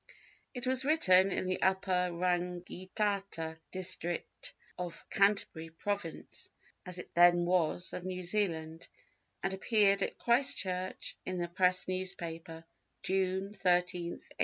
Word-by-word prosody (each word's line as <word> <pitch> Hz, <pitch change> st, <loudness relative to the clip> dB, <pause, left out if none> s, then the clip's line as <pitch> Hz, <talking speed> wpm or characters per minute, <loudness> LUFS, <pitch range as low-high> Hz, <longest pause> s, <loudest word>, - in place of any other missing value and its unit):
It 250 Hz, -, -4 dB
was 260 Hz, 0 st, +2 dB
written 195 Hz, -11 st, +5 dB
in 185 Hz, -, -1 dB
the 185 Hz, 0 st, -1 dB
Upper 190 Hz, -1 st, +2 dB
Rangitata 180 Hz, 0 st, -2 dB
district 185 Hz, -, -2 dB, 0.2 s
of 175 Hz, -2 st, -6 dB
Canterbury 195 Hz, -5 st, +2 dB
Province 170 Hz, +1 st, -5 dB, 0.4 s
(as 180 Hz, -1 st, 0 dB
it 180 Hz, -, -9 dB
then 175 Hz, 0 st, +6 dB
was) 175 Hz, 0 st, +1 dB
of 180 Hz, -, -5 dB
New 185 Hz, 0 st, -4 dB
Zealand, 165 Hz, -4 st, -1 dB, 0.6 s
and 195 Hz, 0 st, 0 dB
appeared 200 Hz, 0 st, +3 dB
at -, -, -2 dB
Christchurch 190 Hz, -7 st, +1 dB
in 185 Hz, 0 st, -4 dB
the 175 Hz, -1 st, -1 dB
Press 180 Hz, +1 st, +2 dB
newspaper, 165 Hz, -3 st, -3 dB, 0.4 s
June 190 Hz, +1 st, 0 dB
13, 185 Hz, -3 st, +3 dB, 0.4 s
1863. -, -, -15 dB
185 Hz, 120 wpm, -32 LUFS, 175-195 Hz, 0.6 s, then